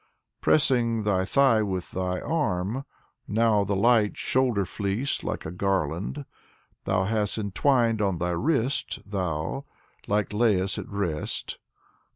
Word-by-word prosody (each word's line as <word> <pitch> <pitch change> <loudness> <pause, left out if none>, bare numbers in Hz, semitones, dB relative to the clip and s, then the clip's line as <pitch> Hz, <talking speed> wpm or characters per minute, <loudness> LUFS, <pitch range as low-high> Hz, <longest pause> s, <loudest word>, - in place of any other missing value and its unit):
Pressing 120 -7 +3
thy 95 -3 +1
thigh 130 -1 +4
with 95 -4 -3
thy 90 0 -2
arm, 120 - -1 0.4
now 110 -1 +3
the 100 0 -1
light 110 0 +3
shoulder 125 -7 +1
fleece 100 +8 -2
like - - -4
a - - -4
garland 95 - -1 0.6
Thou 95 0 +1
hast 105 +1 0
entwined 115 +2 +2
on 95 -3 +1
thy 90 +1 -1
wrist, 135 - 0
thou, 90 - -2 0.5
like 105 0 +1
Liasus 105 -3 +2
at - - -7
rest. 95 -7 -3
105 Hz, 125 wpm, -26 LUFS, 95-115 Hz, 0.6 s, thigh